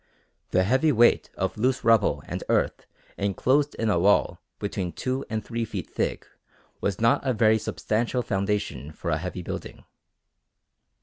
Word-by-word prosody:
The 95 Hz, -, +3 dB
heavy 130 Hz, +10 st, +3 dB
weight 120 Hz, -2 st, +4 dB
of 95 Hz, +2 st, -2 dB
loose 130 Hz, +3 st, +1 dB
rubble 115 Hz, -2 st, +3 dB
and -, -, -5 dB
earth -, -, 0 dB, 0.3 s
enclosed 130 Hz, +9 st, +1 dB
in 110 Hz, -2 st, 0 dB
a 85 Hz, -, +2 dB
wall 100 Hz, +4 st, +3 dB, 0.2 s
between 95 Hz, -4 st, -3 dB
two 130 Hz, +8 st, -2 dB
and 110 Hz, -1 st, -3 dB
three 115 Hz, -1 st, -2 dB
feet 110 Hz, -, -5 dB
thick -, -, -2 dB, 0.6 s
was 100 Hz, -2 st, -1 dB
not 115 Hz, +1 st, +3 dB
a 130 Hz, -2 st, +1 dB
very 110 Hz, 0 st, +4 dB
substantial 120 Hz, +4 st, -1 dB
foundation 100 Hz, -, -2 dB
for 85 Hz, +2 st, -4 dB
a 75 Hz, -, +1 dB
heavy 90 Hz, +1 st, -5 dB
building. -, -, -7 dB
110 Hz, 150 wpm, -26 LUFS, 95-120 Hz, 0.6 s, weight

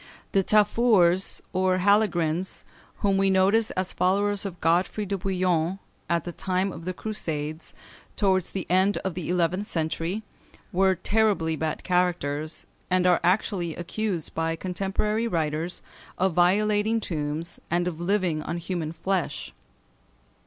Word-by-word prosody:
The 195 Hz, -, +3 dB
Tafurs, 205 Hz, -3 st, +3 dB
or 185 Hz, 0 st, +2 dB
Halegrins, 185 Hz, -3 st, +1 dB, 0.4 s
whom 200 Hz, -1 st, +2 dB
we 195 Hz, 0 st, +3 dB
notice 195 Hz, +4 st, +3 dB
as 185 Hz, 0 st, -1 dB
followers 200 Hz, +2 st, +1 dB
of 180 Hz, -3 st, -9 dB
Godefroy 180 Hz, +5 st, +1 dB
de 200 Hz, 0 st, -2 dB
Bouillon 180 Hz, -2 st, 0 dB, 0.3 s
at 170 Hz, -2 st, +1 dB
the 175 Hz, -, -5 dB
time 185 Hz, +2 st, -1 dB
of 165 Hz, -1 st, -9 dB
the 185 Hz, -, -2 dB
Crusades, 160 Hz, -8 st, -4 dB, 0.4 s
towards 190 Hz, -3 st, +2 dB
the 190 Hz, -, -4 dB
end 190 Hz, +3 st, +3 dB
of 190 Hz, -, -1 dB
the 175 Hz, -1 st, -5 dB
eleventh 180 Hz, +3 st, +1 dB
century, 165 Hz, +5 st, -2 dB, 0.5 s
were 190 Hz, +1 st, +3 dB
terribly 195 Hz, -4 st, +1 dB
bad 155 Hz, 0 st, -3 dB
characters, 155 Hz, -4 st, 0 dB, 0.2 s
and 185 Hz, 0 st, +2 dB
are 180 Hz, -1 st, +5 dB
actually 180 Hz, -2 st, +1 dB
accused 180 Hz, -1 st, -3 dB
by 165 Hz, 0 st, -1 dB
contemporary 195 Hz, +5 st, -1 dB
writers 165 Hz, -2 st, -2 dB, 0.3 s
of 190 Hz, -1 st, +1 dB
violating 210 Hz, +5 st, +3 dB
tombs, 160 Hz, -3 st, -3 dB
and 175 Hz, +1 st, +1 dB
of 170 Hz, -2 st, -4 dB
living 180 Hz, -4 st, +1 dB
on 170 Hz, -, -4 dB
human 170 Hz, -2 st, -3 dB
flesh. 165 Hz, -, -2 dB
180 Hz, 135 wpm, -26 LUFS, 165-195 Hz, 0.5 s, are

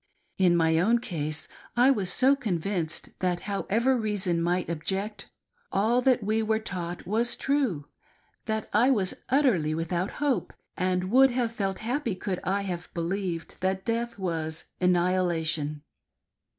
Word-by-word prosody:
In 175 Hz, -2 st, +5 dB
my 160 Hz, -1 st, +3 dB
own 225 Hz, +7 st, +4 dB
case, 155 Hz, -8 st, -4 dB, 0.3 s
I 250 Hz, +3 st, +6 dB
was 195 Hz, -8 st, +2 dB
so 265 Hz, +6 st, +5 dB
con 220 Hz, -11 st, -1 dB
vinced 165 Hz, -2 st, -3 dB
that, 180 Hz, -1 st, 0 dB
however 225 Hz, +5 st, +1 dB
reason 205 Hz, -7 st, 0 dB
might 175 Hz, +1 st, 0 dB
object, 195 Hz, +6 st, -3 dB, 0.4 s
all 225 Hz, +5 st, +2 dB
that 250 Hz, -3 st, +3 dB
we 215 Hz, +2 st, +1 dB
were 220 Hz, 0 st, +1 dB
taught 180 Hz, -5 st, -5 dB
was 225 Hz, +6 st, 0 dB
true, 265 Hz, -, 0 dB, 0.6 s
that 220 Hz, -1 st, -1 dB
I 235 Hz, +5 st, +5 dB
was 200 Hz, -8 st, +2 dB, 0.2 s
utterly 210 Hz, -, +3 dB
without 170 Hz, +3 st, -2 dB
hope, 285 Hz, -3 st, 0 dB, 0.2 s
and 185 Hz, +1 st, 0 dB
would 265 Hz, +2 st, +7 dB
have 245 Hz, -2 st, 0 dB
felt 195 Hz, -5 st, -2 dB
happy 245 Hz, -3 st, -1 dB
could 185 Hz, 0 st, -3 dB
Ihave 190 Hz, -2 st, -2 dB
believed 170 Hz, 0 st, -3 dB
that 190 Hz, +1 st, -1 dB
death 235 Hz, 0 st, -1 dB
was 165 Hz, -4 st, -3 dB
annihila 180 Hz, -2 st, +2 dB
tion. 150 Hz, -1 st, -2 dB
190 Hz, 145 wpm, -27 LUFS, 175-230 Hz, 0.6 s, would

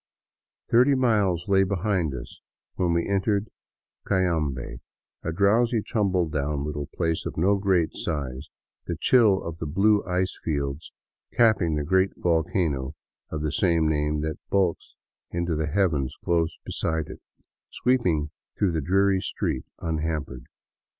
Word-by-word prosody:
Thirty 130 Hz, +4 st, +5 dB
miles 105 Hz, -9 st, +1 dB
lay 95 Hz, -1 st, +4 dB
behind 95 Hz, -5 st, 0 dB
us 65 Hz, -, -9 dB, 0.3 s
when 90 Hz, -2 st, 0 dB
we 85 Hz, 0 st, 0 dB
entered 100 Hz, +1 st, 0 dB, 0.6 s
Cayambe, 80 Hz, -10 st, 0 dB, 0.4 s
a 80 Hz, -, -3 dB
drowsy, 110 Hz, +5 st, +2 dB
tumble 95 Hz, -6 st, +1 dB
down 75 Hz, -1 st, -2 dB, 0.3 s
place 80 Hz, -1 st, 0 dB
of -, -, -7 dB
no 95 Hz, +5 st, +3 dB
great 95 Hz, -4 st, +2 dB
size, 70 Hz, -2 st, -4 dB, 0.4 s
the -, -, -2 dB
chill 110 Hz, -7 st, +4 dB
of 85 Hz, 0 st, -6 dB
the 80 Hz, -, -3 dB
blue 100 Hz, +7 st, +3 dB
ice 90 Hz, +1 st, -1 dB
fields 70 Hz, -1 st, -3 dB, 0.4 s
cap 110 Hz, -3 st, +4 dB
ping 85 Hz, -4 st, 0 dB
the 75 Hz, -, -1 dB
great 95 Hz, +4 st, +2 dB
volcano 80 Hz, -5 st, 0 dB, 0.3 s
of 75 Hz, -1 st, -4 dB
the 75 Hz, -, 0 dB
same 85 Hz, +1 st, +2 dB
name 75 Hz, 0 st, 0 dB
that 80 Hz, 0 st, -3 dB
bulks 95 Hz, -4 st, 0 dB, 0.3 s
into 85 Hz, -1 st, -1 dB
the 75 Hz, 0 st, -1 dB
heavens 75 Hz, -6 st, 0 dB
close 85 Hz, -1 st, +1 dB
beside 80 Hz, -1 st, -2 dB
it, -, -, -10 dB, 0.5 s
sweeping 90 Hz, -13 st, +1 dB, 0.3 s
through 100 Hz, -3 st, +2 dB
the 80 Hz, -1 st, -1 dB
dreary 95 Hz, +4 st, +2 dB
streets -, -, -3 dB
unhampered. 75 Hz, -6 st, -3 dB
85 Hz, 135 wpm, -25 LUFS, 75-100 Hz, 0.6 s, Thirty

